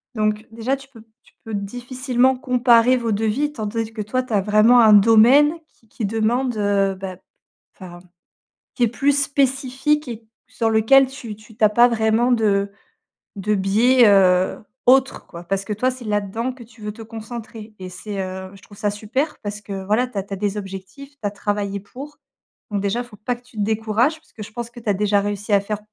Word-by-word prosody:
donc, 215 0 -1
déjà, 230 +4 -2
tu 270 0 -15
peux 230 -5 -15 0.2
tu - - -25
peux 225 - -7
difficilement 245 +5 0
comparer 250 -1 +4
vos 235 -2 -2
2 215 +2 -1
vies, 285 +8 0
tandis 225 -1 -4
que 220 - -5
toi, 255 +5 -1
tu 255 - -13
as 205 - +3
vraiment 215 +4 +5
un 220 -1 +6
domaine 230 +8 +6 0.2
qui 225 - -32
qui 220 - -4
demande, 225 +4 0
heu, 200 -1 +1
beh, 185 -1 -7 0.6
enfin, 175 -2 -11 0.8
qui 245 - 0
est - - +5
plus 280 +5 +1
spécifique 275 +1 0
et 230 -1 -8 0.2
sur 225 -1 -1
lequel 225 +5 +5
tu 255 -4 -8
tu 215 +1 -17
tu 225 - -2
as 215 - +7
pas 235 +3 +5
vraiment 225 +2 +1
de 200 -3 +1 0.7
de 205 +2 -1
biais, 225 +6 +4
heu, 185 -1 +4 0.3
autres, 265 +1 +3
quoi 170 0 -10
parce 195 +2 -2
que 215 - -6
toi 255 +5 0
c'est 250 -1 -10
là 210 -1 0
dedans 225 +6 -3
que 250 -1 -13
tu 230 -1 -19
veux 210 - -4
te 225 - -10
concentrer 225 -1 -9
et 185 - -7
c'est, 195 +3 -7
heu, 190 0 -6
je 195 - -16
trouve 205 - -16
ça 210 0 -1
super 235 +9 -3
parce 210 0 -5
que 195 -2 -7
voilà 215 +6 +1
tu 250 - -10
as 195 - -1
tu 200 - -9
as - - -4
des 205 +1 -2
objectifs, 195 +7 -8
tu 285 - -32
as 205 - 0
travaillé 205 -1 -3
pour, 275 +8 -11 0.5
donc 200 -1 -1
déjà, 205 +5 -1
faut 240 -3 -15
pas 245 +4 -3
que 240 - -19
tu 245 -2 -18
te - - -1
décourages 220 +6 +1
parce 315 - -30
que 220 - -11
je 210 - -11
pense 235 0 -5
que 240 - -11
tu 220 - -4
as - - +3
déjà 205 0 +2
réussi 205 +1 -3
à 200 - +5
faire 210 +1 -4
220 Hz, 220 wpm, -21 LUFS, 205-245 Hz, 0.8 s, as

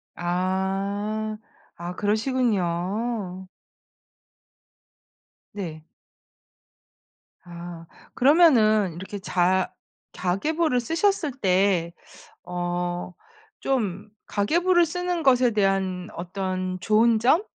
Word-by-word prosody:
아 195 +4 -2 0.4
아 175 +1 -6
그러시군요. 205 -3 -1 2.1
네. 165 -6 -6 1.6
아 170 -1 -9 0.3
그러면은 240 - +5
이렇게 190 +4 -7
자 185 0 +1 0.4
가계부를 250 - 0
쓰셨을 330 - 0
때 185 -3 +2 0.5
어 175 0 -3 0.5
좀 210 -6 -2 0.2
가계부를 345 - +2
쓰는 355 0 -2
것에 250 -2 +4
대한 195 -3 0
어떤 185 +1 -3
좋은 220 +3 +4
점? 270 - +3
200 Hz, 145 characters per minute, -25 LUFS, 180-245 Hz, 2.1 s, 그러면은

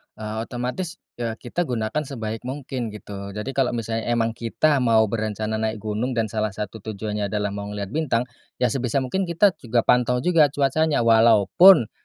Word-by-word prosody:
eee, 110 0 -6
otomatis 125 +10 -4 0.2
ya 115 -2 -2
kita 155 +9 -3
gunakan 110 -3 -2
sebaik 115 -5 -5
mungkin, 130 -2 -4
gitu. 100 -2 -8
Jadi, 105 +6 -4
kalau 130 -2 0
misalnya 115 -1 -3
emang 115 -1 +1
kita 135 +6 +1
mau 115 -3 +4
berencana 110 0 -2
naik 110 -1 -3
gunung, 110 +4 -2
dan 115 -1 -1
salah 110 -3 -2
satu 105 +1 -5
tujuannya 105 0 -4
adalah 105 0 -2
mau 100 0 -5
melihat 105 -1 -5
bintang, 145 -7 0 0.3
ya 125 -2 +1
sebisa 130 +1 -1
mungkin 190 +9 -2
kita 170 +4 +4
juga 120 -2 0
pantau 125 0 +2
juga, 165 -4 +5
cuacanya. 145 0 +1
Walaupun, 115 - +6
115 Hz, 170 wpm, -23 LUFS, 110-130 Hz, 0.3 s, Walaupun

